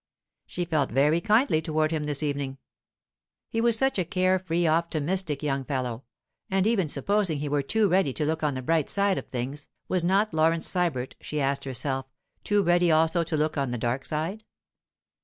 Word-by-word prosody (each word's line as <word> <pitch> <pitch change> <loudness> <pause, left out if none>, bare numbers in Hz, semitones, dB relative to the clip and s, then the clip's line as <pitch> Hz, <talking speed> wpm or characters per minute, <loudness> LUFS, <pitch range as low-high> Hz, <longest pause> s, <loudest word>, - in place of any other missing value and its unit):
She 175 - -3
felt 155 -5 0
very 150 +7 +2
kindly 215 - +3
toward 155 0 0
him 155 -2 -1
this 150 0 -1
evening. 140 -2 -2 0.9
He 225 - 0
was 235 -1 +3
such 265 -3 +2
a - - +2
care 185 +1 +1
free, 175 -1 -1
optimistic 165 0 0
young 135 -2 -1
fellow; 130 -3 -3 0.4
and 190 0 +1
even 215 -6 +2
supposing 175 +4 0
he 145 +1 -3
were 145 0 +1
too 215 +9 +1
ready 185 -5 +2
to 150 - -2
look 160 +1 -1
on 150 -3 0
the 130 - -5
bright 160 +1 +1
side 200 -1 +1
of - - -10
things, 135 +4 -5 0.2
was 185 -2 0
not 195 +3 +2
Laurence 160 +1 +2
Sybert, 165 -9 -1
she 150 - -4
asked 140 0 -1
herself, 135 0 -3 0.4
too 205 -1 +2
ready 175 -1 +3
also 160 +2 +3
to 160 -1 -2
look 150 0 0
on 135 -2 -1
the 120 - -2
dark 120 +3 -1
side? 165 +8 -3
160 Hz, 190 wpm, -26 LUFS, 140-185 Hz, 0.9 s, kindly